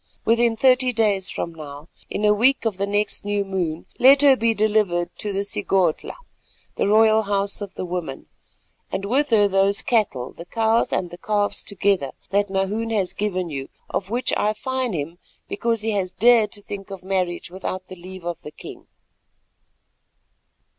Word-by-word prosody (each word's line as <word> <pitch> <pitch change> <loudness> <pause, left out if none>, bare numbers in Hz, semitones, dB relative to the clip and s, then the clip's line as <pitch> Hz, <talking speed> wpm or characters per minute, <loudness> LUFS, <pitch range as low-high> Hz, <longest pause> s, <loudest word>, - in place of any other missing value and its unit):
Within 230 0 +3
thirty 255 +1 +4
days 210 -5 +1
from 170 - -4
now, 150 -1 -10 0.2
in 210 - -3
the 210 0 +5
week 240 +5 +3
of 215 -4 -1
the 200 +1 -1
next 205 +1 0
new 205 0 -1
moon, 175 -4 -3
let 275 +3 +7
her 275 -2 +7
be 230 -1 +1
delivered 210 -5 +1
to 210 - -1
the 195 0 -1
Sigodhla, 190 -4 0 0.6
the - - -1
royal 220 +1 +5
house 200 -1 -1
of 200 -2 -7
the - - -4
women, 175 -6 -5 0.7
and 195 - -3
with 275 +8 +1
her 210 -3 +4
those 195 +1 +2
cattle, 210 - 0
the 170 - -11
cows 225 +2 +1
and 180 -2 -1
the 175 - -10
calves 205 0 0
together, 195 -8 0 0.2
that 200 0 +1
Nahoon 195 +4 -1
has 200 -5 0
given 185 -5 -2
you, 135 -1 -5 0.2
of 195 - -3
which 240 +3 0
I 210 +1 +1
fine 260 0 -2
him 165 +2 -5 0.3
because 230 -2 -1
he 225 - 0
has 190 -3 -2
dared 225 -1 +4
to 205 - -3
think 200 -1 -8
of 195 -2 -8
marriage 185 -2 -2
without 185 0 -5
the 185 - -10
leave 185 0 -11
of 175 -1 -4
the - - -8
king." - - -12
200 Hz, 175 wpm, -22 LUFS, 185-220 Hz, 0.7 s, let